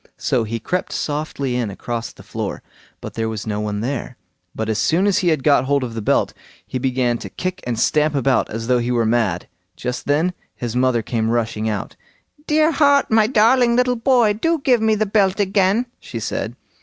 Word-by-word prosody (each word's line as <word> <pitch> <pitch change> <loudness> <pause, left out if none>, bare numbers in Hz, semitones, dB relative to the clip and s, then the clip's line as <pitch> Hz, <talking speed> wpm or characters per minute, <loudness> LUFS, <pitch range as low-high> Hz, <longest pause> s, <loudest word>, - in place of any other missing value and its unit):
So 120 -3 0
he 115 +2 -3
crept 180 +11 -2
softly 145 -3 -2
in 120 -4 -1
across 115 +4 -5
the - - -15
floor, - - -5 0.4
for - - -6
there 115 -1 -2
was 110 -2 -5
no 105 -1 -2
one 105 -1 -2
there; 125 0 -4 0.4
but 110 - -3
as 110 -1 0
soon 175 +5 +2
as 205 -1 +3
he 185 - 0
had 155 -5 +2
got 140 -2 +4
hold 140 0 +1
of 120 -2 -5
the 115 - -4
belt, - - +1 0.3
he 130 - -4
began 125 -2 0
to - - -7
kick 185 0 -4
and 120 -2 -1
stamp 150 +3 +2
about 135 -1 +2
as 115 +1 -4
though 125 +1 +2
he 120 +1 -2
were 120 -2 +1
mad. 110 -6 0 0.3
Just 125 0 -4
then 155 +6 +2 0.2
his 120 -1 -4
mother 125 -2 +2
came 115 -1 -1
rushing 110 -2 -1
out. 105 -2 -4 0.5
"Dear 310 +1 +3
heart, 285 -3 +3
my 220 -1 +5
darling 235 +1 +4
little 250 0 +2
boy! 240 -3 +3
do 330 +11 0
give 250 -4 +3
me 220 -1 +3
the 215 +1 +1
belt 195 -1 +2
again", 200 +3 +2
she - - -7
said. - - -3
135 Hz, 205 wpm, -20 LUFS, -, 0.5 s, my